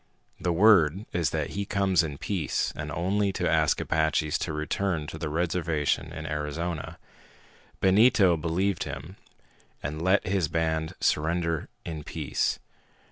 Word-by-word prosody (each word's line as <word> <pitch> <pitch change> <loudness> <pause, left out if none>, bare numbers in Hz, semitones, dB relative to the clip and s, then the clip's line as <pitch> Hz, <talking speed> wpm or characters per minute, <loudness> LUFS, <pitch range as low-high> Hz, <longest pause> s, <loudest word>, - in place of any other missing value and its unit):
The 90 - 0
word 95 -1 +5
is 85 -3 +1
that 80 -2 -2
he 100 - -2
comes 100 -3 +2
in 75 -4 -4
peace 90 -3 -1
and 75 0 -5
only 100 +5 0
to - - -1
ask - - +2
Apaches 80 -1 +1
to - - -2
return 75 +2 -1
to 80 +1 -7
the 80 - -3
reservation 80 -2 0
in 80 -1 -7
Arizona. 75 +2 -3 0.8
Benito 95 -2 +5
believed 85 +4 -1
him 75 +6 -7 0.7
and 75 +3 -4
let 95 +3 +3
his 95 -3 +1
band 80 0 -1
surrender 85 +1 0 0.2
in 80 -3 -5
peace. - - -1
80 Hz, 135 wpm, -27 LUFS, 75-95 Hz, 0.8 s, word